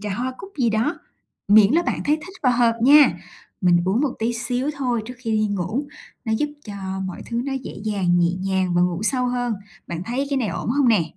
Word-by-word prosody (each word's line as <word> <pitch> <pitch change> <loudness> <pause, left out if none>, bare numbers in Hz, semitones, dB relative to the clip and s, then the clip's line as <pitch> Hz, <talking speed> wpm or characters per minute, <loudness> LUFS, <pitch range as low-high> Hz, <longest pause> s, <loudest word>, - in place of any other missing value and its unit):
trà 205 -2 -3
hoa 255 +4 -3
cúc 390 - -10
gì 235 -3 +2
đó, 225 +9 0 0.5
miễn 210 +2 +7
là 340 +2 +4
bạn - - -2
thấy 300 +1 +3
thích 360 +5 -11
và 255 - +4
hợp 235 -1 +3
nha. 290 +3 +6 0.4
Mình 180 -2 +4
uống 195 +6 +1
một 275 -3 0
tí 230 +2 0
xíu 245 +4 -2
thôi, 245 -4 0
trước 250 - -7
khi 240 -3 -4
đi 215 0 +2
ngủ, 210 - -2 0.4
nó 220 - -1
giúp 295 +7 0 0.2
cho 205 - -7 0.3
mọi 185 - -7
thứ 235 0 -2
nó 275 - -3
dễ 265 -1 -5
dàng, 190 -5 +1
nhẹ 170 0 +3
nhàng 185 -1 -1
và 175 - +4
ngủ 180 +1 0
sâu 250 +3 +1
hơn. 245 -1 -1 0.3
Bạn 170 0 -5
thấy 255 +6 -2
cái 280 - +1
này 235 -6 0
ổn 170 - -4
hông 275 -1 +3
nè? 215 -7 +4
235 Hz, 235 wpm, -22 LUFS, 200-260 Hz, 0.5 s, miễn